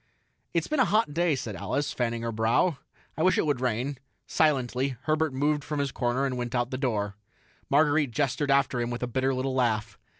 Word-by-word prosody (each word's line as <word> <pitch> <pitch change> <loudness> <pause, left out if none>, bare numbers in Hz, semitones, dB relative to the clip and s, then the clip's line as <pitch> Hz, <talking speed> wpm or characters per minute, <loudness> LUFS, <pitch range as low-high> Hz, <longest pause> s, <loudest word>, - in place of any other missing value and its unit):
"It's - - +2
been 305 -2 -1
a - - +5
hot 210 -5 +2
day," 170 -1 +2
said 115 -5 -5
Alice, 140 +10 -2
fanning 115 -1 -2
her 115 - -2
brow. 115 +8 +1 0.4
"I - - -3
wish 185 +2 +4
it - - +2
would 145 -5 0
rain." 125 +2 -1 0.3
Silently, 135 -3 +1
Herbert 155 0 +1
moved 145 +2 0
from 150 0 -4
his 140 -1 -1
corner 125 +3 0
and 130 -2 -2
went 120 0 -3
out 120 +1 0
the 130 - -2
door. 105 -6 -1 0.5
Marguerite 145 0 +3
gestured 140 +2 -1
after 135 -3 +2
him 120 - -1
with 120 0 -4
a - - 0
bitter 130 +2 0
little 130 0 -1
laugh. 115 -4 0
130 Hz, 205 wpm, -27 LUFS, 120-145 Hz, 0.5 s, a